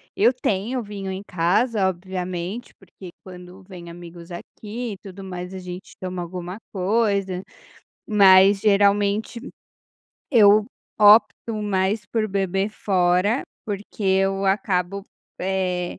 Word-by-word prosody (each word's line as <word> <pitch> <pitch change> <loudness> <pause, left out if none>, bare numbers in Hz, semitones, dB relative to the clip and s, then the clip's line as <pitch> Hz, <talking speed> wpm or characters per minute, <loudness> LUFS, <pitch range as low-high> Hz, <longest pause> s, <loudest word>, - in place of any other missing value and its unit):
eu 230 +5 +4
tenho 240 +1 -2
vinho 200 -2 -6
em 190 +1 -5
casa, 190 +4 +1
obviamente, 185 +3 -5
porque 185 -1 -13
quando 180 0 -12
vem 175 -3 -10
amigos 170 0 -12
aqui 220 +6 -7
e - - -10
tudo 195 0 -11
mais 180 0 -7
a 190 - -6
gente 180 +1 -9
toma 185 -1 -4
alguma 180 +2 -7 0.2
coisa, 195 -1 0 0.6
mas, 195 -1 +6
geralmente, 205 +2 +2 0.9
eu 210 -3 +5 0.3
opto 215 +2 +5
mais 200 +1 0
por 220 -2 -1
beber 195 0 -1
fora, 190 +2 +1 0.2
porque 205 +1 -6
eu 195 0 +1
acabo, 195 0 0 0.3
eh, 180 -1 -2
195 Hz, 115 wpm, -23 LUFS, 180-205 Hz, 0.9 s, mas